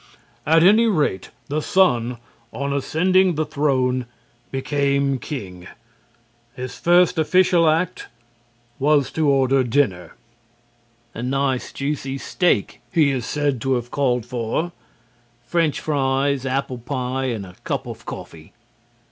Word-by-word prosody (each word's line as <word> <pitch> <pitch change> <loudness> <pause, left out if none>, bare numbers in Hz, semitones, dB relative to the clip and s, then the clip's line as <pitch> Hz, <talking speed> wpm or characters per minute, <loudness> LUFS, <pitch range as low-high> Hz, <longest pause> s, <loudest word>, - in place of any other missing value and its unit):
At 160 +1 +5
any 215 +5 +6
rate, 150 - 0 0.2
the 150 +2 -1
son, 125 -11 +2 0.3
on 140 +1 -3
ascending 180 +6 +2
the 155 +1 0
throne, 130 -4 0 0.4
became 140 0 0
king. 95 -10 -7 0.9
His 130 0 -7
first 175 0 +4
official 175 0 +4
act 165 +3 -1 0.7
was 145 0 +2
to 155 -2 +1
order 135 -1 +3
dinner. 115 -8 0 1.0
"A 115 - -6
nice, 135 0 -1
juicy 135 -1 -3
steak," 175 - 0
he 150 -4 +3
is 130 -3 -3
said 145 -5 -1
to 135 +1 +1
have 120 0 -4
called 125 -5 0
for, 120 +7 -2 0.7
"French 160 +2 0
fries, 135 -2 0
apple 130 -1 -2
pie 130 +1 -3
and 115 -6 -3
a 90 - -12
cup - - -2
of - - -8
coffee." 80 -1 -9
140 Hz, 120 wpm, -21 LUFS, 125-155 Hz, 1.0 s, any